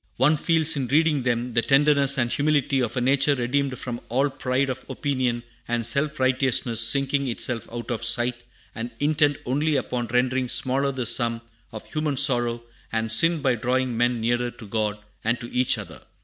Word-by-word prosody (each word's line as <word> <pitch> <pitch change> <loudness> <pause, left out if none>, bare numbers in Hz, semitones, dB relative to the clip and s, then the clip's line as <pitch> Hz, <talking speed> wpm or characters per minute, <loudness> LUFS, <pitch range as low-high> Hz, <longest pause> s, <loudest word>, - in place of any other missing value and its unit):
One 150 +4 +3
feels, 160 0 +2
in 135 -3 -2
reading 150 +1 +2
them, 120 0 -2
the 115 - +2
tenderness 140 +2 +4
and 120 -2 0
humility 145 -2 +1
of 120 -1 -2
a - - 0
nature 140 +3 +2
redeemed 130 +1 -1
from 120 -2 -6
all 135 +4 +1
pride 130 0 -1
of 130 0 -5
opinion 130 -4 -2 0.2
and 120 -1 -2
self 145 +5 0
righteousness, 130 -3 +2
sinking 140 +3 +2
itself 120 -1 -1
out 120 +1 -6
of 115 -1 -3
sight, 120 +1 0 0.3
and 115 +1 -5
intent 145 -1 +2
only 145 +4 0
upon 125 -3 -2
rendering 125 +1 0
smaller 135 +3 +1
the 130 -2 -4
sum 115 0 +1 0.3
of 110 -2 -9
human 155 -3 -1
sorrow 120 -3 +3 0.3
and 110 0 -2
sin 165 +6 +2
by 130 - +2
drawing 125 +2 -1
men 120 +1 +1
nearer 120 +2 0
to 115 - -12
God, 105 0 -2 0.3
and 115 +2 0
to 120 - -9
each 125 0 +2
other. - - -9
130 Hz, 180 wpm, -24 LUFS, 120-140 Hz, 0.3 s, tenderness